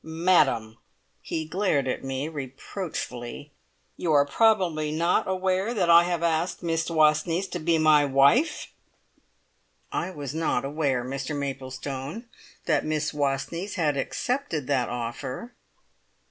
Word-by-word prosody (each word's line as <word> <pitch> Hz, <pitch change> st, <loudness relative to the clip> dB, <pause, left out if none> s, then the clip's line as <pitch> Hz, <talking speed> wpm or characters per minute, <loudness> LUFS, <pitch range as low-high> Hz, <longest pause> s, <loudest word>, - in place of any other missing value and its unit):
"Madam!" 155 Hz, -10 st, +2 dB, 0.4 s
he 160 Hz, -, -3 dB
glared 155 Hz, -6 st, 0 dB
at 130 Hz, -, -2 dB
me 135 Hz, +2 st, -3 dB
reproachfully 140 Hz, -2 st, -6 dB, 0.5 s
"you 170 Hz, -, -1 dB
are 145 Hz, -1 st, +5 dB
probably 170 Hz, -4 st, +2 dB
not 170 Hz, +3 st, +1 dB
aware 190 Hz, +4 st, 0 dB
that 175 Hz, -5 st, +3 dB
I 170 Hz, +1 st, +8 dB
have 175 Hz, -1 st, -1 dB
asked 165 Hz, +2 st, 0 dB
Miss 165 Hz, 0 st, -1 dB
Wastneys 165 Hz, +3 st, +2 dB
to 175 Hz, -, -3 dB
be 165 Hz, +1 st, +2 dB
my 155 Hz, -2 st, +5 dB
wife?" 140 Hz, -, +3 dB, 1.2 s
"I 175 Hz, -, -2 dB
was 145 Hz, -6 st, -6 dB
not 155 Hz, -5 st, 0 dB
aware, 140 Hz, -4 st, -1 dB
Mr 135 Hz, +3 st, -4 dB
Maplestone, 135 Hz, -, -5 dB, 0.4 s
that 160 Hz, -, +2 dB
Miss 155 Hz, -1 st, -1 dB
Wastneys 150 Hz, +7 st, -2 dB
had 155 Hz, -6 st, +1 dB
accepted 205 Hz, -, -2 dB
that 130 Hz, -3 st, 0 dB
offer." 125 Hz, -, -5 dB
155 Hz, 125 wpm, -26 LUFS, 135-175 Hz, 1.2 s, I